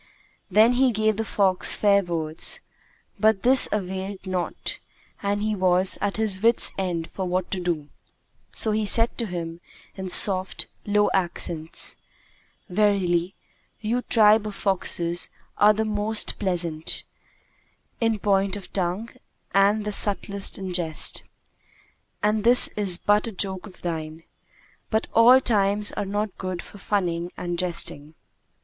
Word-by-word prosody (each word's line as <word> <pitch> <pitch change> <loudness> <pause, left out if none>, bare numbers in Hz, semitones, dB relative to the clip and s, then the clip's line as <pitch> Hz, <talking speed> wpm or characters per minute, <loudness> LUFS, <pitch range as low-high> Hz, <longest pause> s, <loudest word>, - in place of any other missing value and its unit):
Then 215 +5 +4
he 255 0 +2
gave 215 -1 0
the 225 - -2
fox 195 -3 +4
fair 200 -1 +3
words, 160 -4 0 0.6
but 220 -2 +2
this 260 +2 +7
availed 190 0 -5
naught 185 -2 -4 0.4
and 205 +1 -2
he 215 0 -1
was 185 0 +2
at 205 0 -2
his 210 -4 -1
wits' 230 +1 +3
end 175 -4 -4
for 190 - -5
what 180 0 -3
to 190 - -3
do; 170 -5 -3 0.6
so 220 - +4
he 215 0 -1
said 230 +3 +4
to 230 - -1
him 170 -2 -7 0.3
in 190 -1 -6
soft, 185 0 +4 0.2
low 205 0 +2
accents, 170 -3 -2 0.7
"Verily, 185 -3 0 0.4
you 230 +3 -2
tribe 215 -2 +3
of 210 - -7
foxes 175 -3 0 0.3
are 210 +1 +6
the 220 +1 -2
most 210 0 -2
pleasant 170 -5 -2 1.0
people 225 -1 +1
in - - -7
point 200 -1 0
of 200 -2 -11
tongue 190 +4 -2 0.4
and 205 +2 +2
the 210 - -3
subtlest 200 -1 0
in 190 -2 -6
jest, 165 -3 +1 1.0
and 210 0 0
this 240 +2 +6
is 195 -4 +1
but 205 +4 +1
a - - -5
joke 190 0 -3
of 190 - -16
thine; 160 -1 -6 0.7
but 220 0 -1
all 240 +3 +6
times 205 -4 +2
are 205 - -4
not 205 0 -4
good 185 -2 -5
for 205 - -14
funning 175 -4 -2
and 175 -1 -4
jesting." 160 -4 -2
195 Hz, 145 wpm, -23 LUFS, 180-210 Hz, 1.0 s, this